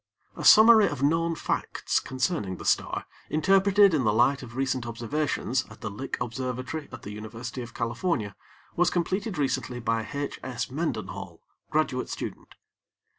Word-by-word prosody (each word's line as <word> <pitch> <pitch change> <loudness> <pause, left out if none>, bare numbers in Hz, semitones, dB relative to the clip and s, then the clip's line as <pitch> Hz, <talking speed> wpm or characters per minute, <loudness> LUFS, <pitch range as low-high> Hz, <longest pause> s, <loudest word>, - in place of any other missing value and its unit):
A - - -6
summary 220 -1 +8
of 140 -2 -4
known 165 +3 +2
facts - - -1
concerning 105 -7 -2
the - - -9
star, - - +1 0.2
interpreted 195 +4 +4
in 145 -5 +2
the 110 - +3
light 125 +6 +3
of 120 -2 -10
recent 130 -2 -1
observations 125 +2 -1
at - - -14
the 110 -3 -4
Lick 130 +7 -4
Observatory 130 +5 -4
at 130 - -9
the 105 - -7
University 110 +4 -6
of 120 - -9
California 115 - -1 0.4
was 175 0 +3
completed 185 +3 -1
recently 130 -3 -1
by 115 -1 -1
H. 140 0 -4
S. 125 -1 -4
Mendenhall, 100 - -4 0.3
graduate - - 0
student. - - -6
130 Hz, 150 wpm, -27 LUFS, 115-160 Hz, 0.4 s, summary